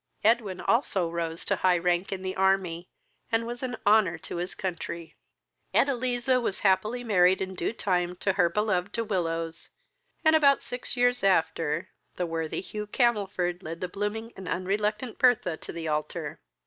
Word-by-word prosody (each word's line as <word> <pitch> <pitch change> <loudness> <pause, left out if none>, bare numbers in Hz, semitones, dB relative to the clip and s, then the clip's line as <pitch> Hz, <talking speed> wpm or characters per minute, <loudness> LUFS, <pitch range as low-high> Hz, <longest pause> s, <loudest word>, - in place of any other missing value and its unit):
Edwin 215 -4 +2
also 195 -8 +1
rose 170 0 -3
to - - +1
high 180 -1 +3
rank 175 +2 0
in 190 -1 -4
the 185 0 -3
army, 190 -3 +1 0.4
and 225 0 +1
was 240 +1 -5
an 250 -3 -3
honour 205 -5 +4
to 165 - -6
his 180 +2 -4
country. 170 -3 -5 0.6
Edeliza 255 -1 +2
was 200 - -2
happily 210 +5 +2
married 190 -4 +4
in 190 0 -3
due 175 - -2
time 180 -5 -1
to 190 +1 0
her 180 -3 +3
beloved 205 0 0
De 230 - 0
Willows, 165 -5 -2 0.6
and, 315 0 +6
about 280 -3 +5
six 245 0 -5
years 245 -2 +3
after, 165 -3 +1 0.3
the 180 - -1
worthy 165 -1 -3
Hugh 210 +2 -6
Camelford 200 -7 +1
led 165 -1 -6
the 180 - -2
blooming 210 +4 -4
and 190 -1 -9
unreluctant 210 +5 -1
Bertha 245 -9 +3
to - - -8
the 165 -1 -5
altar. 150 0 -3
190 Hz, 165 wpm, -28 LUFS, 175-225 Hz, 0.6 s, and